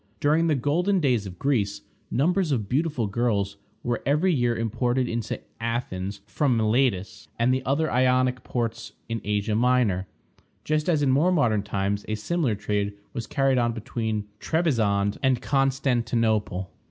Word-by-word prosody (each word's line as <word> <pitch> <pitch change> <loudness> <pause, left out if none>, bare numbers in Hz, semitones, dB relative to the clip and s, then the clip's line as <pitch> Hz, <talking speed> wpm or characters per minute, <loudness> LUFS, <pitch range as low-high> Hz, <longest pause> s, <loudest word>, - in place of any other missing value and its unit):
During 155 +3 +3
the 155 - +3
golden 175 +9 +1
days 125 - +1
of 90 -1 -9
Greece, 105 -7 0 0.3
numbers 175 +4 +1
of 110 -7 0
beautiful 145 - 0
girls 100 -2 0 0.3
were 120 -1 -1
every 155 +6 +2
year 120 -4 +1
imported 120 +3 0
into 115 -2 -3 0.2
Athens 100 -4 -3
from 130 +1 +1
Miletus 110 -2 0
and 120 +2 +3
the 130 0 -1
other 155 +4 +1
Ionic 130 0 +2
ports 115 -2 -3
in 115 -1 -3
Asia 105 +1 -1
Minor, 115 -5 +2 0.6
just 155 +2 0
as 155 -4 +2
in 135 - +3
more 155 +8 +3
modern 120 - +2
times 100 0 -2
a 110 - -1
similar 125 +2 0
trade 105 0 -1 0.2
was 115 -4 -4
carried 135 -2 +2
on 120 -1 +1
between 110 -1 -3
Trebizond 110 -12 +1
and 130 -3 +2
Constantinople. 120 -8 0
120 Hz, 150 wpm, -25 LUFS, 105-135 Hz, 0.6 s, During